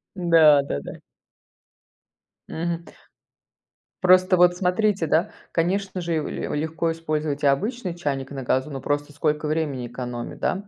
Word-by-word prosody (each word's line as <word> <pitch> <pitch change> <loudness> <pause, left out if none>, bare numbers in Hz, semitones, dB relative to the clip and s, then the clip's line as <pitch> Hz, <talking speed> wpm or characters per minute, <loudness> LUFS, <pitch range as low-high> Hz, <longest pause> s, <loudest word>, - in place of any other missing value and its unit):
Да 165 -5 +6
да-да. 70 - -5 1.6
Мгм. 170 +1 -3 1.2
Просто 185 +1 +5
вот 175 0 +4
смотрите, 190 -1 +1
да, 165 +7 +2 0.2
конечно 185 +2 -1
же, 170 -2 -1
ле - - -4
легко 160 +2 -1
использовать 155 -3 -2
и - - +4
обычный 185 - 0
чайник 140 -5 -3
на 135 -2 -5
газу, 130 +3 0
но 135 -3 -6
просто 145 +1 -2
сколько 150 +1 -1
времени 150 -6 -2
экономит, 120 -1 -6
да, 195 +2 -1
160 Hz, 130 wpm, -24 LUFS, 145-180 Hz, 1.6 s, Да